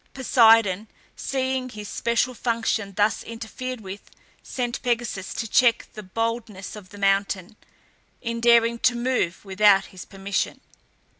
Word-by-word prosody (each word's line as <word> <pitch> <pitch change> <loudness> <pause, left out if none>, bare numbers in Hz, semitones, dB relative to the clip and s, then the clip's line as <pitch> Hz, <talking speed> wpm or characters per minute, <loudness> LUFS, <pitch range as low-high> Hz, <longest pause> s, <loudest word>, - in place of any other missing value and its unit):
Poseidon, 225 -6 +4 0.3
seeing 260 -1 -2
his 210 -3 -8
special 235 +3 0
function 225 -4 -1
thus 210 +1 +2
interfered 230 +2 -6
with, 195 0 -9 0.3
sent 245 -2 -4
Pegasus 235 -6 -2
to 225 - -3
check 240 0 +3
the 215 - -8
boldness 220 -1 -4
of 200 -3 -11
the 205 - -12
mountain, 195 0 0 0.6
in 230 -1 -4
daring 235 0 +4
to 245 +1 +3
move 235 -8 -1
without 195 0 +4
his 185 - -9
permission. 195 0 -3
225 Hz, 130 wpm, -24 LUFS, 200-240 Hz, 0.6 s, Poseidon